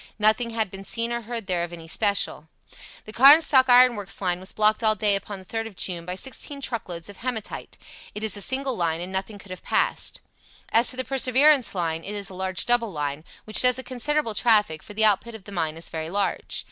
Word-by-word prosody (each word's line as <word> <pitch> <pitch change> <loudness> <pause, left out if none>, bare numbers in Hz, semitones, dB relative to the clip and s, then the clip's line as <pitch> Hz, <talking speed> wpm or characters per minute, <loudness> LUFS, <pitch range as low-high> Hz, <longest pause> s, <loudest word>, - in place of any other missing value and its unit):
Nothing 215 +3 +2
had 220 -4 -2
been 195 0 -9
seen 230 +4 -1
or 235 - -3
heard 230 -1 -6
there 180 -3 -1
of 175 - -6
any 165 -1 -10
special. 165 -3 0 0.6
The 215 - -11
Carnstock 270 +1 +6
Iron 250 0 +6
Works 200 -3 -4
line 180 -2 -1
was 190 +1 -6
blocked 215 +2 +2
all 215 -1 +3
day 205 0 +1
upon 200 +1 -5
the 190 - -14
3rd 225 +3 -4
of 215 - -13
June 175 -2 -2
by 180 +1 -4
sixteen 275 +6 -4
truckloads 185 -11 -5
of 200 -1 -11
hematite. 230 -4 -5 0.4
It 210 - -6
is 220 -2 0
a 205 - -4
single 265 +4 -1
line, 165 -3 -1
and 180 +2 -6
nothing 195 +2 -4
could 195 -1 -14
have 185 - -8
passed. - - -1 0.5
As 230 +2 +5
to 255 - -1
the 255 - -2
Perseverance 265 -1 +4
line, 165 -2 -2
it 205 - -6
is 200 -2 -1
a - - -10
large 185 0 -1
double 240 -3 +1
line, 145 -2 -4 0.2
which 215 - +2
does 250 0 +4
a 260 - -6
considerable 260 -1 -1
traffic, 210 -8 +2
for 210 - -12
the 220 +1 +3
output 215 +2 +1
of 215 - -12
the 200 - -12
mine 160 -4 -2
is 165 - -6
very 160 0 -5
large. 200 +2 -2
210 Hz, 230 wpm, -24 LUFS, 185-240 Hz, 0.6 s, Carnstock